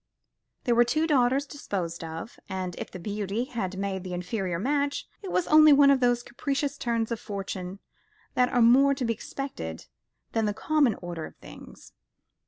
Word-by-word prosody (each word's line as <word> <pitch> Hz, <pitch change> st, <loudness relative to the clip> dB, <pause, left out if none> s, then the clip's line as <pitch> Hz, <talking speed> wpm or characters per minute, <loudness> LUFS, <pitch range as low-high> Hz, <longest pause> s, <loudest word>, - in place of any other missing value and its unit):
Here 245 Hz, -, +3 dB
were 240 Hz, +1 st, +6 dB
two 310 Hz, +7 st, +1 dB
daughters 270 Hz, -2 st, +3 dB
disposed 185 Hz, -, -4 dB
of; 165 Hz, +7 st, -7 dB
and 185 Hz, -1 st, -3 dB
if -, -, -5 dB
the -, -, -8 dB
beauty 205 Hz, +3 st, -2 dB
had 210 Hz, -8 st, -4 dB
made 195 Hz, -1 st, -3 dB
the 180 Hz, -1 st, -4 dB
inferior 180 Hz, -1 st, -2 dB
match, 280 Hz, +7 st, -1 dB
it 385 Hz, -3 st, -6 dB
was 360 Hz, -, +1 dB
only 310 Hz, 0 st, +7 dB
one 280 Hz, 0 st, +7 dB
of 275 Hz, -, +4 dB
those 245 Hz, -1 st, +2 dB
capricious 280 Hz, +3 st, -2 dB
turns 235 Hz, -4 st, -1 dB
of 230 Hz, -, -2 dB
fortune 195 Hz, -2 st, -5 dB, 0.6 s
that 250 Hz, 0 st, +3 dB
are 245 Hz, -, +3 dB
more 275 Hz, +4 st, +6 dB
to 265 Hz, -2 st, -2 dB
be 230 Hz, -, +1 dB
expected 215 Hz, -, -6 dB, 0.5 s
than 225 Hz, -1 st, +1 dB
the 210 Hz, -1 st, -1 dB
common 285 Hz, -4 st, +2 dB
order 170 Hz, -2 st, -5 dB
of -, -, -16 dB
things. -, -, -13 dB
235 Hz, 180 wpm, -27 LUFS, 190-275 Hz, 0.6 s, only